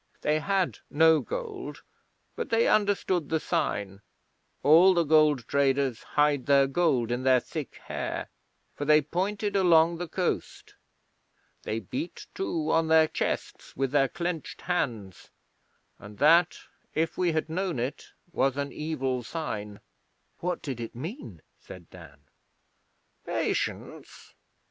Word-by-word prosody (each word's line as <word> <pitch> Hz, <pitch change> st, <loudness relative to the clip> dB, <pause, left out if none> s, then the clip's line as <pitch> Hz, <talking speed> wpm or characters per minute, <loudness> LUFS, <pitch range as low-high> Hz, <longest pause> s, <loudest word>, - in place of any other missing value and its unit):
They 155 Hz, +1 st, +1 dB
had 195 Hz, +2 st, 0 dB
no 160 Hz, +1 st, +5 dB
gold, 450 Hz, -6 st, -6 dB, 0.5 s
but -, -, -4 dB
they 230 Hz, 0 st, +3 dB
understood 200 Hz, -6 st, +1 dB
the 160 Hz, -, +1 dB
sign 100 Hz, -8 st, -2 dB, 0.6 s
(all 175 Hz, +6 st, +7 dB
the 170 Hz, -, +3 dB
gold 150 Hz, -5 st, +3 dB
traders 135 Hz, -3 st, +1 dB
hide 145 Hz, -3 st, +1 dB
their 140 Hz, -1 st, +5 dB
gold 135 Hz, -5 st, +1 dB
in 120 Hz, +1 st, -1 dB
their 130 Hz, -1 st, +4 dB
thick -, -, -7 dB
hair), -, -, -4 dB, 0.4 s
for -, -, -5 dB
they 150 Hz, +1 st, +5 dB
pointed 200 Hz, +6 st, -2 dB
along 170 Hz, -3 st, +4 dB
the 175 Hz, -, -4 dB
coast. 180 Hz, +2 st, -3 dB, 0.9 s
They 110 Hz, -, -3 dB
beat, 285 Hz, -, -6 dB
too, 165 Hz, -, -2 dB
on 165 Hz, 0 st, +2 dB
their 160 Hz, 0 st, +5 dB
chests -, -, -4 dB
with 135 Hz, -1 st, 0 dB
their 140 Hz, -2 st, +3 dB
clenched 170 Hz, +3 st, -5 dB
hands, 120 Hz, -, -3 dB, 0.7 s
and 105 Hz, 0 st, -12 dB
that, 165 Hz, +4 st, +4 dB, 0.4 s
if 160 Hz, +1 st, 0 dB
we 175 Hz, -2 st, +1 dB
had 155 Hz, -1 st, -1 dB
known 175 Hz, -1 st, -2 dB
it, 125 Hz, +4 st, -4 dB, 0.3 s
was 135 Hz, -3 st, +1 dB
an 140 Hz, 0 st, -2 dB
evil 135 Hz, -5 st, -2 dB
sign.' 105 Hz, -8 st, -5 dB, 0.6 s
'What 180 Hz, +1 st, -3 dB
did 135 Hz, -6 st, -5 dB
it 115 Hz, 0 st, -6 dB
mean?' 130 Hz, -, -8 dB, 0.2 s
said 90 Hz, -3 st, -13 dB
Dan. 80 Hz, -6 st, -14 dB, 1.0 s
'Patience. -, -, -4 dB
155 Hz, 130 wpm, -27 LUFS, 130-175 Hz, 1.0 s, all